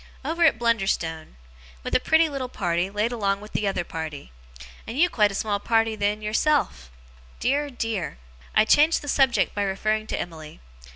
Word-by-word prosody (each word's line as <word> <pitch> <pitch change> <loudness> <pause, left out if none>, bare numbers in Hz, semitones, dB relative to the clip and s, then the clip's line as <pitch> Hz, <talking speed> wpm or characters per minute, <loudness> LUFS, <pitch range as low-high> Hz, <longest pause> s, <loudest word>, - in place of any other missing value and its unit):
Over 330 +3 0
at 290 -8 +4
Blunderstone. 195 - -1 0.5
With - - -5
a - - +5
pretty 320 +5 +3
little 275 -4 -4
party 175 -4 -1
laid 210 +4 -1
along 200 -4 0
with 210 +1 -12
the 210 - -1
other 195 -3 -1
party. 155 - -7 0.6
And 230 - -5
you 345 +3 +4
quite 210 -3 +3
a - - -6
small 205 0 -1
party 225 +1 +1
then, 210 0 -1
yourself. 215 - 0 0.5
Dear, 285 +3 0
dear!' 225 - -3 0.4
I 215 - +5
changed 300 +7 +4
the - - -8
subject 270 -3 +2
by 205 - -2
referring 215 +2 -1
to - - -3
Emily. 160 -3 -8
215 Hz, 175 wpm, -24 LUFS, 195-255 Hz, 0.6 s, a